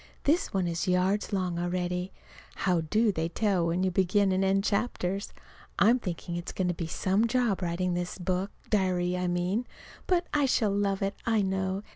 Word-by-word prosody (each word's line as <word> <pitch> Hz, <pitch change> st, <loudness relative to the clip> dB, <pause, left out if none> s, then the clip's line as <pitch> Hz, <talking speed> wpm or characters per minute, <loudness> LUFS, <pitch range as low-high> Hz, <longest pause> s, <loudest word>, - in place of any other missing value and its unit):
This 320 Hz, +5 st, +2 dB
one 190 Hz, -2 st, 0 dB
is 170 Hz, +1 st, -2 dB
yards 185 Hz, +3 st, +1 dB
long 180 Hz, -3 st, -1 dB
already. 180 Hz, +1 st, -2 dB, 0.4 s
How 180 Hz, -3 st, +1 dB
do 215 Hz, +8 st, +2 dB
they 165 Hz, -3 st, -2 dB
tell 190 Hz, -3 st, +1 dB
when 175 Hz, +2 st, 0 dB
to 190 Hz, -, +1 dB
begin 190 Hz, +2 st, +2 dB
and 185 Hz, +1 st, +1 dB
end 195 Hz, +1 st, +2 dB
chapters? 200 Hz, -3 st, -1 dB, 0.5 s
I'm 235 Hz, +5 st, +5 dB
thinking 175 Hz, -4 st, -5 dB
it's 175 Hz, 0 st, -4 dB
going 185 Hz, -1 st, -1 dB
to -, -, +1 dB
be 165 Hz, -1 st, -4 dB
some 195 Hz, +7 st, +1 dB
job, 235 Hz, -5 st, +1 dB
writing 180 Hz, +1 st, -1 dB
this 175 Hz, 0 st, -3 dB
book 185 Hz, +1 st, -1 dB, 0.2 s
diary, 180 Hz, -3 st, +1 dB
I 180 Hz, 0 st, -1 dB
mean. 180 Hz, +7 st, -1 dB, 0.4 s
But 355 Hz, -1 st, +2 dB
I 290 Hz, -2 st, +3 dB
shall 220 Hz, -5 st, +2 dB
love 200 Hz, -1 st, 0 dB
it, 195 Hz, +1 st, 0 dB
I 220 Hz, -3 st, +3 dB
know. 190 Hz, +1 st, -1 dB
190 Hz, 185 wpm, -28 LUFS, 180-205 Hz, 0.5 s, I'm